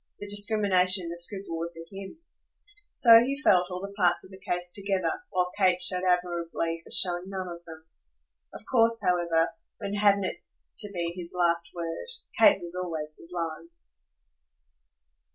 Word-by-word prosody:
The 205 - -8
discrimination 205 -3 +3
and 170 - -5
the 170 - -6
scruple 180 -2 -3
were 170 +1 -3
for 165 +2 -12
HIM. 195 +7 -8 0.7
So 230 -2 +8
he 270 +4 -1
felt 180 -10 +3
all 180 0 -5
the 200 0 -7
parts 180 -4 +2
of - - -14
the 190 - -12
case 180 -1 -3
together, 200 - -1
while 180 0 0
Kate 185 -3 +3
showed 180 0 -1
admirably 170 -2 -1
as - - +4
feeling 175 -1 -2
none 190 -1 -5
of 170 -1 -8
them. 160 -1 -12 0.7
Of - - -11
course, 230 -2 +3
however 170 -2 +2 0.3
when 200 -2 -5
hadn't 200 -1 +3
it - - -4 0.4
to 205 - +2
be 170 -3 -3
his 175 -1 -6
last 170 -1 +1
word? 165 - -5 0.3
Kate 300 -9 +6
was 175 -1 -5
always 160 -4 -4
sublime. 165 - -6
180 Hz, 165 wpm, -27 LUFS, 170-200 Hz, 0.7 s, So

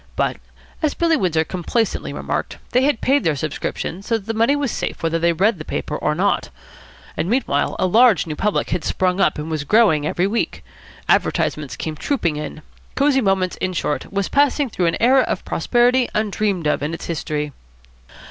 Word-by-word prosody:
But, - - 0 0.4
as 310 -3 0
Billy 335 -1 +2
Windsor 170 - +1
complacently 185 +7 -2
remarked, - - -3
they 250 - +3
had 285 -6 +1
paid 280 +2 +2
their 155 - +1
subscriptions, 155 +5 -4
so 230 - +2
that 205 - -12
the 225 - -2
money 230 +6 +3
was 285 -5 -1
safe - - -4
whether 165 0 +1
they 170 +1 +3
read 190 +3 +1
the - - -5
paper 150 - -4
or 150 0 0
not. 200 +5 0 0.7
And, 175 - -2
meanwhile, 220 - 0
a - - +1
large 225 +3 +5
new 155 -2 -4
public 210 +6 -1
had 175 - -1
sprung 185 +1 0
up - - +2
and 150 +2 -5
was 155 -2 -2
growing 160 -5 +3
every 175 - 0
week. 220 +4 -2 0.4
Advertisements 150 -3 +1
came 155 -1 -4
trooping 170 - -1
in. 155 +1 -6 0.3
Cosy 275 -1 +3
Moments, 190 -3 +1
in 185 0 -2
short, 150 -3 -2
was 200 -1 -1
passing 285 -2 +2
through 180 -3 0
an 165 - 0
era 260 +3 +5
of - - -2
prosperity 245 +1 +2
undreamed 205 -4 0
of 150 - +1
in 150 +3 -2
its - - -8
history. 150 -2 -3
190 Hz, 190 wpm, -20 LUFS, 160-240 Hz, 0.7 s, large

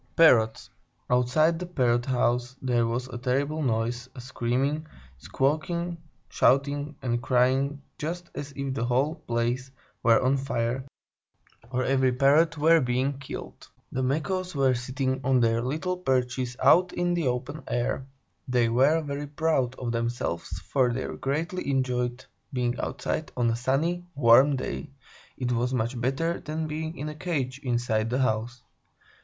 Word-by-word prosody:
PARROTS 115 -9 +4 0.4
Anonymous 125 0 +3
Outside 165 +2 +4
the 180 - -4
Parrot 120 -7 +1
house 125 -1 0
there 120 -3 +1
was 120 +2 -2
a 120 -1 -6
terrible 140 +5 0
noise; 120 -1 -1
a - - -8
screaming, 130 +5 -1 0.3
squawking, 165 - -1 0.3
shouting, 145 +2 +2
and 120 -2 0
crying, 135 +3 +1 0.2
just 170 +3 -4
as 145 0 -6
if 140 -1 -3
the 130 - -2
whole 130 +5 +1
place 120 -2 -2 0.3
were 115 -1 +5
on 130 +2 +2
fire, 130 -1 -1 0.9
or 130 0 -1
every 130 0 +2
Parrot 150 +6 +4
were 160 +2 +5
being 130 +2 0
killed. 135 - -8 0.2
The 130 - -2
Macaws 170 +7 -1
were 135 -2 +3
sitting 130 +1 -2
on 130 -1 +3
their 115 -1 +2
little 160 +9 -2
perches 130 -5 -1
out 180 +1 +5
in 175 0 0
the 170 -5 0
open 125 +5 -3
air. 120 +2 -1 0.4
They 125 -2 +2
were 135 +7 +4
very 145 0 -4
proud 145 -4 0
of 125 -2 -3
themselves, 115 -8 -2
for 125 +3 +1
they 130 +2 -2
greatly 160 +5 -2
enjoyed 125 -1 -1 0.3
being 125 -2 -1
outside 155 +3 -3
on 120 -2 +2
a - - 0
sunny, 155 +9 0
warm 135 +2 +6
day; 135 +3 -4 0.5
it 125 -1 -2
was 125 +2 0
much 120 +1 -2
better 135 +7 0
than 155 +1 -4
being 155 +1 -4
in 150 - -4
a 150 - -4
cage, 145 -5 -3
inside 120 -3 0
the 125 - 0
house. 120 0 -1
130 Hz, 150 wpm, -27 LUFS, 120-150 Hz, 0.9 s, warm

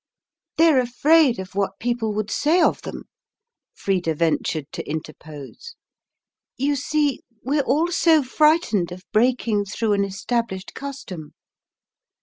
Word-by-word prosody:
"They're 320 -4 +5
afraid 265 +2 +3
of 190 0 -7
what 195 -1 -1
people 235 -2 -1
would 215 0 -2
say 320 +5 +2
of - - +2
them," - - -7 0.7
Frida 180 -5 -1
ventured 160 -1 0
to - - -7
interpose. 155 - -8 0.8
"You 285 +3 +1
see, 295 0 0 0.2
we're 285 +3 +1
all 320 +5 +1
so 330 -4 +4
frightened 265 - +2
of 185 +1 -9
breaking 225 -2 +2
through 210 +2 -1
an 200 0 +2
established 195 0 -3
custom." 195 - -8
230 Hz, 125 wpm, -22 LUFS, 190-290 Hz, 0.8 s, They're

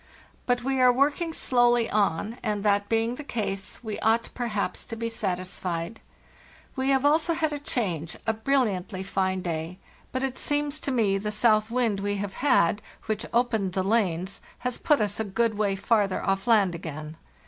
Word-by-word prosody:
But 245 -1 +1
we 265 0 +1
are 250 0 +7
working 290 +6 +1
slowly 240 -5 +3
on, 205 +2 0
and, 210 -1 -2
that 205 -1 +2
being 225 +1 +1
the 290 +4 -7
case, 200 -5 -4
we 215 -2 -4
ought, 225 +1 +1
perhaps, 225 -5 -2
to 230 - -6
be 230 +1 -3
satisfied. 185 -2 -3 0.8
We 265 0 0
have 270 0 +3
also 315 +3 +3
had 315 -2 0
a 290 - -3
change—a 195 - -2
brilliantly 215 -6 0
fine 190 -1 -1
day; 165 +1 -3 0.3
but 260 +1 -2
it 265 -1 -2
seems 290 0 -1
to 280 - -2
me 210 -6 +2
the 210 +2 -3
south 215 0 +3
wind 230 -4 +1
we 205 +1 -1
have 200 -1 -4
had, 275 -11 +5
and 205 +5 -3 0.2
which 220 0 -2
apened 225 -6 +1
the 190 - 0
lanes, 190 -3 0 0.2
has 250 -1 -1
put 295 -6 +3
us 205 0 -1
a - - +1
good 220 +2 0
way 205 -2 +1
farther 200 -1 +1
off 195 +3 0
land 205 -6 +4
again. 155 -2 -6
215 Hz, 180 wpm, -26 LUFS, 195-245 Hz, 0.8 s, are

